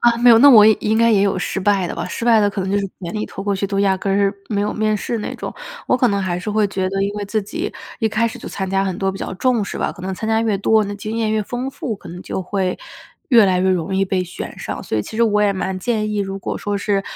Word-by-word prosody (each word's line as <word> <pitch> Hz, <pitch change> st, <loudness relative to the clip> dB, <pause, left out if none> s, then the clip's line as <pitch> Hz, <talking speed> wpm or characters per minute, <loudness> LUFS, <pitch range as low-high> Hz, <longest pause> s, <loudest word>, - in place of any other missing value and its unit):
啊， 235 Hz, -1 st, +4 dB
没 240 Hz, 0 st, +6 dB
有， 225 Hz, -, +8 dB
那 285 Hz, -, +9 dB
我 215 Hz, -4 st, +9 dB
应 220 Hz, 0 st, +3 dB
该 230 Hz, 0 st, +4 dB
也 200 Hz, -2 st, +4 dB
有 195 Hz, -2 st, +1 dB
失 190 Hz, +1 st, -2 dB
败 195 Hz, -2 st, +2 dB
的 -, -, -5 dB
吧。 -, -, -4 dB
失 230 Hz, -, -5 dB
败 230 Hz, -2 st, +5 dB
的 205 Hz, -, +2 dB
可 200 Hz, -1 st, -4 dB
能 190 Hz, +1 st, -2 dB
就 200 Hz, -, +1 dB
是 200 Hz, -, -1 dB, 0.2 s
简 170 Hz, -2 st, -5 dB
历 215 Hz, 0 st, -2 dB
投 195 Hz, -, -7 dB
过 200 Hz, 0 st, 0 dB
去 195 Hz, +1 st, -1 dB
都 195 Hz, 0 st, -2 dB
压 195 Hz, -1 st, +3 dB
根 195 Hz, +1 st, -2 dB
儿 200 Hz, 0 st, +2 dB
没 205 Hz, -2 st, -1 dB
有 210 Hz, -, -1 dB
面 215 Hz, 0 st, 0 dB
试 230 Hz, +3 st, -3 dB
那 -, -, -4 dB
种。 -, -, -6 dB, 0.3 s
我 250 Hz, -, +3 dB
可 250 Hz, -1 st, +3 dB
能 200 Hz, -1 st, 0 dB
还 180 Hz, -2 st, -2 dB
是 180 Hz, +4 st, -4 dB
会 210 Hz, 0 st, +2 dB
觉 190 Hz, -1 st, -2 dB
得 195 Hz, 0 st, -1 dB
因 200 Hz, -, -1 dB
为 205 Hz, -1 st, -3 dB
自 215 Hz, +2 st, -1 dB
己 330 Hz, -, -4 dB, 0.3 s
一 220 Hz, -, +2 dB
开 220 Hz, +2 st, +1 dB
始 225 Hz, -, -6 dB
就 -, -, -8 dB
参 190 Hz, -1 st, -4 dB
加 195 Hz, 0 st, +1 dB
很 185 Hz, -2 st, -2 dB
多 195 Hz, -1 st, 0 dB
比 195 Hz, -, -8 dB
较 -, -, -5 dB
重 235 Hz, +1 st, +1 dB
视 -, -, -6 dB
吧， -, -, -1 dB
可 180 Hz, -, -13 dB
能 190 Hz, +1 st, -3 dB
参 220 Hz, +4 st, -4 dB
加 220 Hz, 0 st, +2 dB
越 215 Hz, -4 st, 0 dB
多， 220 Hz, +2 st, +3 dB
那 205 Hz, 0 st, -5 dB
经 215 Hz, +2 st, -5 dB
验 220 Hz, -2 st, 0 dB
越 215 Hz, -1 st, +1 dB
丰 245 Hz, +5 st, -4 dB
富， 240 Hz, -4 st, -4 dB
可 175 Hz, -, -13 dB
能 175 Hz, +2 st, -8 dB
就 190 Hz, -, -4 dB
会 185 Hz, -1 st, -1 dB, 0.5 s
越 235 Hz, -5 st, +7 dB
来 185 Hz, -1 st, +2 dB
越 190 Hz, 0 st, +2 dB
容 185 Hz, +1 st, -1 dB
易 195 Hz, -, +2 dB
被 185 Hz, -1 st, -1 dB
选 175 Hz, -, -8 dB
上。 -, -, -5 dB
所 110 Hz, -, -3 dB
以 -, -, 0 dB
其 220 Hz, -, -8 dB
实 235 Hz, -, +3 dB
我 210 Hz, -2 st, +3 dB
也 205 Hz, -, +3 dB
蛮 190 Hz, 0 st, -3 dB
建 215 Hz, 0 st, -1 dB
议， 210 Hz, -, -2 dB
如 195 Hz, -1 st, -2 dB
果 -, -, -4 dB
说 205 Hz, -1 st, -2 dB
是 200 Hz, 0 st, 0 dB
205 Hz, 340 characters per minute, -19 LUFS, 190-220 Hz, 0.5 s, 那